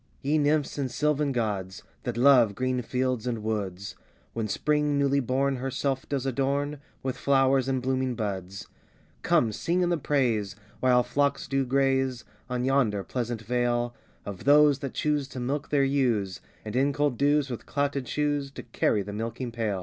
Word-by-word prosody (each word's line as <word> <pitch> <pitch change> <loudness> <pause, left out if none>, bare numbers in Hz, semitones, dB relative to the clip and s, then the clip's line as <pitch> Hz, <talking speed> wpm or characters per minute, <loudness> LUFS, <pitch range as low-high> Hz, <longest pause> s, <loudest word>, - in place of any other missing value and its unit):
] - - -35
YE 150 +3 +2
nymphs 150 0 +1
and 135 -2 -1
sylvan 150 +2 0
gods, 100 -6 -3 0.2
That 120 -2 -3
love 120 -5 +5
green 130 0 -1
fields 125 0 -1
and 115 -3 -2
woods, 100 -3 -3 0.4
When 115 -1 -2
spring 150 +5 +1
newly 140 0 +2
born 135 +1 0
herself 135 +1 -2
does 135 -2 -1
adorn, 140 +2 -1 0.2
With 130 -1 -2
flowers 135 -1 +3
and 130 -2 -1
blooming 130 -1 0
buds: 95 -2 -4 0.5
Come 115 - +2
sing 170 +11 -1
in 175 - +2
the 170 -2 0
praise, 115 -9 0 0.2
while 125 -1 +4
flocks 140 +3 0
do 135 -1 0
graze, 135 -1 +1 0.3
On 125 0 -1
yonder 125 -7 +2
pleasant 120 +3 -4
vale, 120 +1 0 0.3
Of 100 -2 -7
those 145 -1 +6
that 135 -2 -6
choose 150 -2 0
to 130 - -8
milk 135 +4 -2
their 145 -2 +3
ewes, 120 -9 0 0.2
And 105 +1 -5
in 140 +2 +2
cold 145 -2 +1
dews, 145 -1 +2
with 120 - -6
clouted 140 -2 -1
shoes, 145 -2 -1
To - - -8
carry 110 -3 0
the 105 - -7
milking 115 +3 -4
pail. 110 -4 -2
130 Hz, 170 wpm, -27 LUFS, 115-140 Hz, 0.5 s, those